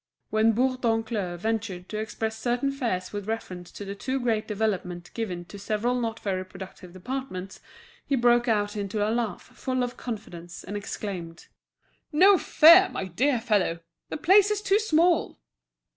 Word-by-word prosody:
When 220 +1 +4
Bourdoncle 225 -6 0
ventured 205 -3 -3
to 215 - -3
express 220 0 -3
certain 245 +4 0
fears 225 -10 -3
with 205 -1 -5
reference 185 -6 -5
to 205 - -7
the 195 - -5
too 260 +6 -2
great 225 -3 0
development 195 -5 -2
given 180 -7 -4
to 200 +4 -11
several 215 +4 0
not 225 -1 -3
very 185 -2 -2
productive 185 -1 -11
departments, 195 -2 -6 0.4
he 280 - 0
broke 240 -1 +3
out 205 -2 +1
into 205 +1 -1
a 220 - 0
laugh 230 -6 -2
full 255 -1 -3
of 245 0 -4
confidence, 175 -7 -7
and 205 - -6
exclaimed: 185 -4 -6 0.6
"No 370 +5 +6
fear! 335 +5 +7
my 195 - -3
dear 245 - +1
fellow, 205 -7 +1 0.3
the - - -3
place 390 +6 +5
is 420 -1 -1
too 400 +1 +3
small!" 345 -4 +2
220 Hz, 160 wpm, -26 LUFS, 190-255 Hz, 0.6 s, fear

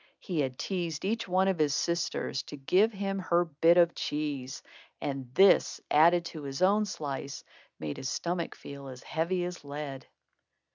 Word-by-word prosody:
He 175 -5 -3
had 130 -3 -1
teased 175 -4 -3
each 225 +2 -1
one 185 +1 +2
of 190 -4 +1
his 150 -2 +2
sisters 170 -5 -1
to 145 - -7
give 185 +11 +3
him 195 -1 -3
her 175 -1 +2
bit 165 +2 +4
of 170 -1 +5
cheese, 145 -3 -3 0.4
and 135 -3 -4
this, 195 0 +5
added 170 +3 +5
to 160 -2 -7
his 140 +3 -3
own 205 +3 +4
slice, 140 -5 -5 0.4
made 75 -2 -4
his 130 - -3
stomach 170 -1 -2
feel 140 -1 -9
as 130 -1 -9
heavy 175 +2 -1
as 180 -2 -6
lead. 140 -2 -6
165 Hz, 170 wpm, -30 LUFS, 140-180 Hz, 0.4 s, of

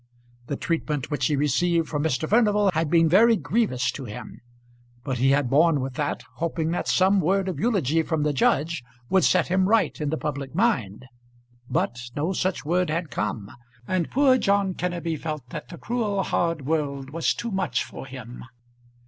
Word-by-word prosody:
The 140 - -2
treatment 150 -3 -2
which 145 - +1
he 150 - +1
received 160 +4 +1
from 145 -2 -2
Mr. 155 0 0
Furnival 210 -2 +3
had 160 -1 0
been 165 0 +4
very 225 +8 +5
grievous 195 - 0
to 135 - -7
him, 105 -3 -9 0.6
but 130 -3 -3
he 135 +2 +3
had 140 -1 +3
borne 150 +3 +4
with 130 0 -4
that, 145 +2 -2
hoping 165 -1 -1
that 175 - -2
some 190 +1 +3
word 190 +3 +1
of 185 - -3
eulogy 170 - +1
from 160 -1 -1
the 150 -1 +1
judge 145 +3 +1 0.3
would 190 -1 +4
set - - +3
him 185 +1 +2
right 225 -7 +2
in 150 - -1
the 160 - -1
public 140 -2 -4
mind. 130 - 0 0.6
But 120 - -1 0.2
no 160 +6 -1
such 185 -3 -1
word 180 +2 +1
had 160 0 -2
come, 105 0 -3 0.4
and 185 -3 0
poor 265 -1 +4
John 200 -2 +2
Kenneby 175 -3 -3
felt 155 -5 -5
that - - -7
the 170 - -9
cruel 210 -4 -1
hard 165 -5 -1
world 140 -3 -2
was 165 +2 0
too 235 - -4
much 155 - 0
for - - -9
him. 125 -2 -9
160 Hz, 180 wpm, -25 LUFS, 140-190 Hz, 0.6 s, very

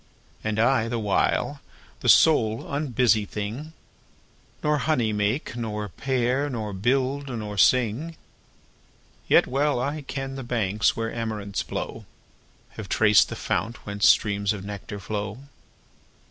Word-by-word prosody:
And 110 -1 -2
I, 115 0 +3
the 120 0 -2
while, 105 -3 0 0.4
the - - 0
sole 115 -8 +5
unbusy 125 -6 +2
thing, 105 +9 -5
5 160 - -13 0.9
Nor 150 0 +2
honey 120 -9 +1
make, 105 +6 -1
nor 105 -3 -4
pair, 130 +5 0
nor 110 -5 -4
build, 130 +7 0
nor 105 -4 -5
sing. 130 +9 +2 1.1
Yet - - +5
well 140 0 0
I 145 +4 -2
ken 135 -1 -5
the 135 - -5
banks 110 -3 0
where 115 0 -2
amaranths 105 -3 -3
blow, - - -5 0.6
Have 100 -3 -9
traced 105 +1 +5
the - - -5
fount 105 +7 -3
whence 100 0 +3
streams 100 -1 +2
of 100 -2 -7
nectar 100 0 -7
flow. 105 +1 -4
115 Hz, 130 wpm, -25 LUFS, 105-135 Hz, 1.1 s, sole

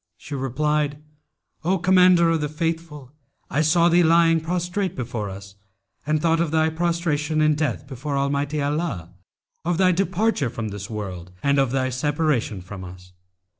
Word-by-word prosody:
She 145 - -10
replied, 145 +2 0 0.7
'O 185 +4 +2
Commander 180 -1 +5
of 165 -2 0
the 150 - -1
Faithful, 155 -3 -4 0.4
I 150 - +2
saw 170 +2 +4
thee 175 +1 +5
lying 165 0 +4
prostrate 180 +3 -2
before 115 -5 -4
us 100 +1 -9 0.5
and 155 0 +2
thought 165 +1 +2
of 170 -1 +1
thy 160 +1 +2
prostration 160 -2 0
in 155 0 +4
death 150 -5 -2
before 140 +1 -4
Almighty 140 +2 -1
Allah, 145 - -2 0.5
of 170 0 0
thy 185 0 +4
departure 190 - 0
from 115 -2 -5
the 100 -1 -6
world 95 -5 -6
and 140 0 +3
of 135 -2 +2
thy 130 0 0
separation 135 - -1
from 95 +1 -9
us. 90 0 -12
150 Hz, 160 wpm, -23 LUFS, 130-165 Hz, 0.7 s, Commander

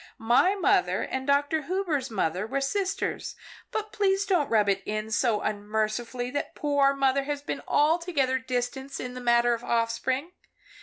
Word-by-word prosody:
My 240 - +3
mother 395 - +2
and 265 +1 -4
Dr. 285 +3 +2
Hubers' 335 -8 -1
mother 190 -1 -1
were 275 +4 -1
sisters, 380 +8 -2 0.3
but 430 -1 -4
please 395 -1 +2
don't 355 -8 +1
rub 215 -2 +3
it 195 -1 +1
in 215 +1 -4
so 225 -2 +1
unmercifully 215 +4 -2
that 285 +1 -4
poor 285 -2 +2
mother 275 0 +2
has 290 0 -3
been - - -4
altogether 300 -4 +2
distanced 260 +2 -3
in 250 0 -5
the 250 - -7
matter 240 0 +3
of 235 0 -4
offspring. 235 +6 -1
265 Hz, 155 wpm, -27 LUFS, 230-295 Hz, 0.3 s, My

